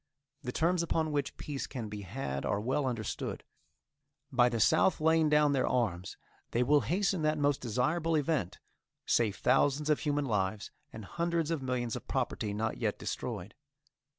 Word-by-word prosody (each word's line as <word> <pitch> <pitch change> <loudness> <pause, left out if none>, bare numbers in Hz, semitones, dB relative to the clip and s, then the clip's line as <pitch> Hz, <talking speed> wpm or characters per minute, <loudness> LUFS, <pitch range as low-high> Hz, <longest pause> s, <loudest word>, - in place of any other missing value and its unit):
The 125 -4 -4
terms 170 +5 +1
upon 160 -2 0
which 145 -2 -2
peace 145 -3 -4
can 120 -5 -5
be 105 0 -6
had 95 - -4
are 100 - 0
well 130 +5 0
understood. 115 -5 -3 0.9
By 125 -2 +4
the 115 -1 -2
South 110 - +4
laying 160 0 +3
down 150 -1 +4
their 135 -2 +1
arms 95 -7 -1 0.3
they 120 - +1
will 145 +3 +4
hasten 190 0 0
that 155 0 +1
most 145 -1 +1
desirable 155 +8 0
event, 145 - 0 0.5
save 110 -4 +2
thousands 145 +2 +2
of 150 - +2
human 145 -1 0
lives, 105 -3 -1 0.2
and 110 -2 -8
hundreds 170 +1 -1
of 160 -4 -1
millions 125 -3 -2
of - - -8
property 105 - -1
not 110 +2 -2
yet - - -1
destroyed. 95 +4 -5
135 Hz, 165 wpm, -31 LUFS, 110-155 Hz, 0.9 s, By